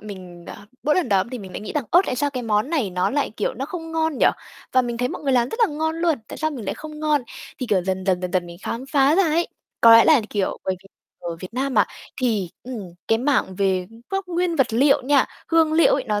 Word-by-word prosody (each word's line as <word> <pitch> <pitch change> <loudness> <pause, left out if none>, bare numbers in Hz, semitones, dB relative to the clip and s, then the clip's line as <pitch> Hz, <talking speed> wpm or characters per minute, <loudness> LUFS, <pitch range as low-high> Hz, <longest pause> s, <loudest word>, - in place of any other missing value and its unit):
mình, 185 -4 -10
ờ, - - -8 0.3
mỗi 300 - +2
lần 360 -8 +1
đó 195 -3 +3
thì 250 - -4
mình 190 -4 -10
lại - - -5
nghĩ 210 - -6
rằng 295 -5 -1
"Ơ, 350 - +7
tại - - -2
sao 285 +2 0
cái 255 -3 -4
món 215 +5 0
này 265 - 0
nó 180 0 0
lại, 285 +1 0
kiểu, 210 - -1
nó 270 +3 -4
không 325 -1 -7
ngon 320 -3 0
nhỉ? - - +5 0.5
Và 255 - +4
mình 240 -1 -3
thấy 250 +1 0
mọi - - -6
người 275 -2 +1
làm 245 -1 +3
rất 455 - -5
là 455 - +6
ngon 320 +1 -1
luôn, 330 -4 +1
tại - - -7
sao 310 0 0
mình 255 -8 -7
lại - - -2
không 305 -1 -9
ngon?". 300 -3 +2 0.4
Thì, 255 - -3
kiểu, 200 -5 +2
dần 190 0 -2
dần, 185 -1 +2
dần 180 -1 -3
dần 180 -2 0
mình 170 0 -10
khám 240 +3 -4
phá 275 +1 +3
ra 390 - +4
ấy, 335 +1 +1 0.3
có 230 0 +8
lẽ 230 - +7
là, 310 -6 +6
kiểu, 200 -2 -1
bởi 190 - 0
vì - - -17 0.4
ở 170 -1 -4
Việt 185 +5 -9
Nam 270 +1 -1
mà, 210 - +5 0.4
thì, 215 -8 0
ừm, 255 -1 -6 0.3
cái 225 - +3
mảng 255 -8 +1
về 190 -2 0 0.2
các 390 0 -1
nguyên 350 -1 0
vật 265 -5 +2
liệu 275 +4 +4
nha, 275 0 +4 0.2
hương 325 -2 +3
liệu 325 +1 +5
ấy, 270 - -2
nó 210 -1 -1
255 Hz, 275 wpm, -22 LUFS, 205-305 Hz, 0.5 s, có